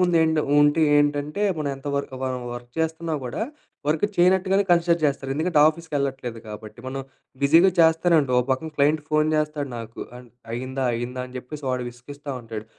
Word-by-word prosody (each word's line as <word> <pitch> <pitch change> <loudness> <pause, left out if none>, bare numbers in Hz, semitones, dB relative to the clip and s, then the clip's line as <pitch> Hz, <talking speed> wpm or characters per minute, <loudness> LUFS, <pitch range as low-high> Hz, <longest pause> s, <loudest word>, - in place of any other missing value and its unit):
ముందెంటో 160 -3 +3 0.2
ఉంటే 145 +2 +4 0.2
ఏంటంటే, 145 +5 +1 0.2
మనం 145 -2 -1
ఎంత 135 - -13
వరకు 140 -2 -4
వర్ 130 -1 -1 0.2
వర్క్ 120 0 -9
చేస్తున్నా 160 0 -2
గూడా 125 - -4 0.5
వర్క్ 155 +4 +2
చేయనట్టుగానే 190 +2 +4
కన్సిడర్ 170 0 +4
జేస్తారు. 140 -2 0
ఎందుకంటే 160 +2 +1
ఆఫీస్‌కెళ్ళట్లేదు 140 -7 -3
కాబట్టి, 105 +1 -9
మనం 135 +1 -4 0.4
బిజీగా 165 +7 +6
చేస్తానే 165 +1 +4
ఉంటాం. 130 -3 -1
ఓ - - 0
పక్కన 130 +5 0
క్లైంట్ 150 +2 +3
ఫోను 155 0 +2
చేస్తాడు 150 -2 -1
నాకు, 115 0 -8 0.2
అన్ 125 0 -13 0.2
అయిందా, 130 +2 -3
అయిందా 120 +2 -3
అని 130 0 -10
చెప్పేసి 145 +3 -9
వాడు 125 -1 -1
విసిగిస్తా 140 +4 -9
ఉంటాడు. 110 -2 -7
145 Hz, 165 wpm, -24 LUFS, 130-160 Hz, 0.5 s, బిజీగా